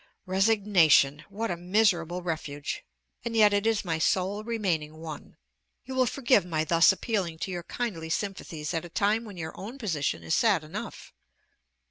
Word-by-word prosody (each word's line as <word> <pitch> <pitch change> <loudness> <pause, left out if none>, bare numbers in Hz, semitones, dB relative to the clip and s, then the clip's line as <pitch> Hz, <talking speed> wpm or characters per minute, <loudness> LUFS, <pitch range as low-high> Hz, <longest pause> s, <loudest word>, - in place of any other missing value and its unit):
Resignation! 185 -7 +4
what 215 +1 -3
a - - -1
miserable 180 -1 +1
refuge! 150 -4 -4 0.4
and 230 -1 -3
yet 210 -2 +6
it 205 +2 +1
is 225 -3 +1
my 165 -2 -1
sole 190 +5 +1
remaining 180 -10 -2
one. 160 -2 -9 0.5
You 265 - -6
will 260 -1 +2
forgive 255 -3 +3
my 160 -3 -1
thus 165 +3 +5
appealing 190 -5 -2
to 190 - -4
your 175 -1 -3
kindly 170 -5 -4
sympathies 170 -4 -3
at 165 - -1
a 175 - -9
time 210 +6 +1
when 205 -4 -10
your 160 -1 -6
own 225 +8 -8
position 155 - -2
is 80 - -2
sad 200 -8 +3
enough. 155 - -8
180 Hz, 165 wpm, -28 LUFS, 160-215 Hz, 0.5 s, yet